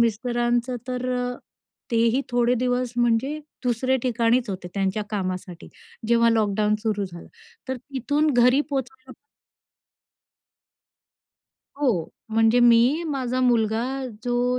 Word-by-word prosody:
मिस्टरांचं 240 Hz, +2 st, 0 dB
तर 250 Hz, 0 st, -3 dB
अ, 245 Hz, 0 st, -3 dB, 0.5 s
तेही 230 Hz, +2 st, +2 dB
थोडे 245 Hz, 0 st, +2 dB
दिवस 250 Hz, 0 st, -1 dB
म्हणजे 240 Hz, +5 st, +1 dB, 0.3 s
दुसरे 255 Hz, +2 st, +1 dB
ठिकाणीच 240 Hz, 0 st, +1 dB
होते 185 Hz, -2 st, -6 dB
त्यांच्या 195 Hz, +1 st, -1 dB
कामासाठी 185 Hz, -3 st, -4 dB, 0.4 s
जेव्हा 235 Hz, 0 st, +4 dB
लॉकडाऊन 210 Hz, -1 st, +1 dB
सुरू 210 Hz, -3 st, -1 dB
झालं, 170 Hz, -2 st, -10 dB, 0.4 s
तर 260 Hz, -, -2 dB
तिथून 285 Hz, +4 st, -1 dB
घरी 250 Hz, +3 st, +5 dB
पोहोचायला 265 Hz, -1 st, -5 dB, 2.7 s
हो, 235 Hz, -, 0 dB, 0.2 s
म्हणजे 225 Hz, +2 st, +3 dB
मी, 240 Hz, +6 st, +5 dB
माझा 255 Hz, -4 st, -2 dB
मुलगा 230 Hz, -2 st, +2 dB, 0.4 s
जो 245 Hz, +1 st, +1 dB
240 Hz, 105 wpm, -24 LUFS, 225-255 Hz, 2.7 s, घरी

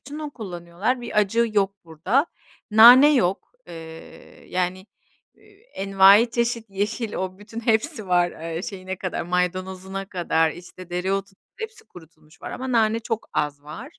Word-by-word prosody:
için 290 Hz, +3 st, -9 dB
onu 305 Hz, -1 st, -5 dB
kullanıyorlar, 190 Hz, +2 st, -4 dB
bir 235 Hz, -3 st, -2 dB
acı 225 Hz, +3 st, +2 dB
yok 200 Hz, -2 st, +1 dB
burada. 180 Hz, -, 0 dB, 0.4 s
Nane 245 Hz, +7 st, +9 dB
yok, 195 Hz, -6 st, 0 dB, 0.2 s
eee, 160 Hz, 0 st, -12 dB
yani, 185 Hz, +1 st, -2 dB, 0.5 s
eee, -, -, -26 dB, 0.3 s
envaiçeşit 220 Hz, +4 st, +3 dB
yeşil 210 Hz, +3 st, -3 dB
o 185 Hz, 0 st, -4 dB
bütün 215 Hz, +2 st, -8 dB
hepsi 225 Hz, +1 st, 0 dB
var, 175 Hz, -1 st, +3 dB, 0.2 s
eee, 165 Hz, -, -4 dB
şeyine 190 Hz, -1 st, -6 dB
kadar, 185 Hz, -1 st, -4 dB
maydanozuna 185 Hz, +2 st, -3 dB
kadar, 165 Hz, -3 st, +1 dB
işte 180 Hz, +1 st, -13 dB
dereotu, 195 Hz, +2 st, -2 dB, 0.3 s
hepsi 445 Hz, 0 st, -8 dB
kurutulmuş 160 Hz, -, -18 dB
var -, -, -6 dB
ama 260 Hz, 0 st, -5 dB
nane 225 Hz, -1 st, +2 dB
çok 225 Hz, -1 st, -4 dB
az 145 Hz, -1 st, -2 dB
var. 210 Hz, -, -10 dB
195 Hz, 140 wpm, -23 LUFS, 180-230 Hz, 0.5 s, Nane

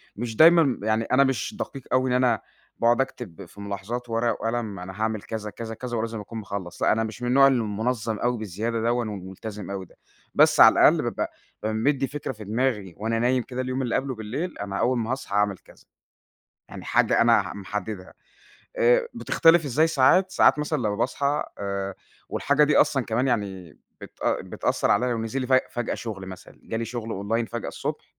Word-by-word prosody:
مش 115 Hz, +1 st, -4 dB
دايمًا 165 Hz, +5 st, +7 dB
ب 130 Hz, -8 st, -1 dB
يعني 110 Hz, +1 st, +1 dB
أنا 140 Hz, +4 st, +3 dB
مش 130 Hz, -7 st, -1 dB
دقيق 135 Hz, -, -5 dB
أوي 130 Hz, 0 st, +2 dB
إن 125 Hz, -, +1 dB
أنا 125 Hz, -3 st, +2 dB, 0.4 s
باقعُد 120 Hz, +2 st, +4 dB
أكتب 95 Hz, -10 st, -6 dB
في 100 Hz, -, -13 dB
ملاحظات 100 Hz, +5 st, -5 dB
ورقة 115 Hz, +1 st, +1 dB
وقلم، 115 Hz, -3 st, -3 dB
أنا 90 Hz, +1 st, -7 dB
هاعمل 110 Hz, -1 st, -1 dB
كذا، 110 Hz, -1 st, -5 dB
كذا، 115 Hz, +2 st, -7 dB
كذا، 120 Hz, +1 st, -4 dB
ولازم 115 Hz, 0 st, -3 dB
أكون 110 Hz, +2 st, -7 dB
مخلّص، 100 Hz, -3 st, -6 dB
لأ، -, -, +4 dB
أنا 110 Hz, +1 st, +1 dB
مش 110 Hz, +1 st, -6 dB
من 125 Hz, -, -2 dB
النوع 135 Hz, +2 st, +6 dB
المُنظّم 115 Hz, -2 st, -1 dB
أوي 120 Hz, 0 st, 0 dB
بزيادة 110 Hz, +3 st, -3 dB
دَوّن 120 Hz, 0 st, 0 dB
وملتزم 100 Hz, 0 st, -7 dB
أوي 95 Hz, -1 st, -5 dB
ده، -, -, -23 dB, 0.4 s
بس -, -, +5 dB
على -, -, +9 dB
الأقل -, -, +5 dB
بابقى -, -, -3 dB, 0.3 s
بابقى 110 Hz, 0 st, -1 dB
مدّي 135 Hz, +4 st, +1 dB
فكرة 145 Hz, -1 st, -5 dB
في 110 Hz, -3 st, -10 dB
دماغي 105 Hz, -3 st, -1 dB
وأنا 115 Hz, +2 st, -1 dB
نايم 125 Hz, +1 st, +2 dB
كده 125 Hz, +1 st, -5 dB
اليوم 130 Hz, +1 st, -2 dB
اللي 120 Hz, -3 st, -1 dB
قبله 135 Hz, -2 st, -1 dB
بالليل، 130 Hz, +12 st, -4 dB
أنا 100 Hz, -1 st, -4 dB
أول 125 Hz, +1 st, +2 dB
ما 115 Hz, 0 st, -2 dB
هاصحي 130 Hz, -6 st, -4 dB
هاعمل 105 Hz, -1 st, +2 dB
كذا، -, -, -21 dB, 0.8 s
يعني -, -, -9 dB
حاجة -, -, +2 dB
أنا -, -, +5 dB
ح -, -, -7 dB
محددها، 100 Hz, 0 st, -6 dB, 0.6 s
آآ -, -, +3 dB
بتختلف 165 Hz, 0 st, +4 dB
إزاي 145 Hz, +4 st, +2 dB
ساعات، 165 Hz, +5 st, +4 dB
ساعات 170 Hz, -, +4 dB
مثلًا 150 Hz, +1 st, -1 dB
لمّا 105 Hz, -5 st, -1 dB
باصحى 140 Hz, +5 st, 0 dB
آآ 100 Hz, -1 st, -3 dB, 0.3 s
والحاجة 145 Hz, +1 st, +2 dB
دي 150 Hz, -, +2 dB
أصلًا 135 Hz, -4 st, +3 dB
كمان 120 Hz, +4 st, 0 dB
يعني 95 Hz, -, -3 dB, 0.2 s
بتأ -, -, -2 dB
بتأثّر -, -, -1 dB
عليّا، 125 Hz, +3 st, +2 dB
ونزل 115 Hz, +4 st, -3 dB
لي 130 Hz, -, -2 dB
فج 130 Hz, 0 st, +5 dB
فجأة 120 Hz, -1 st, -2 dB
شُغل 100 Hz, -5 st, -6 dB
مثلًا، 95 Hz, -1 st, -11 dB
جه 115 Hz, -, -5 dB
لي 115 Hz, -, -2 dB
شُغّل 115 Hz, 0 st, -5 dB
أونلاين 110 Hz, +3 st, -1 dB
فجأة 120 Hz, 0 st, -5 dB
الصُّبح، -, -, -5 dB
115 Hz, 195 wpm, -25 LUFS, 105-130 Hz, 0.8 s, على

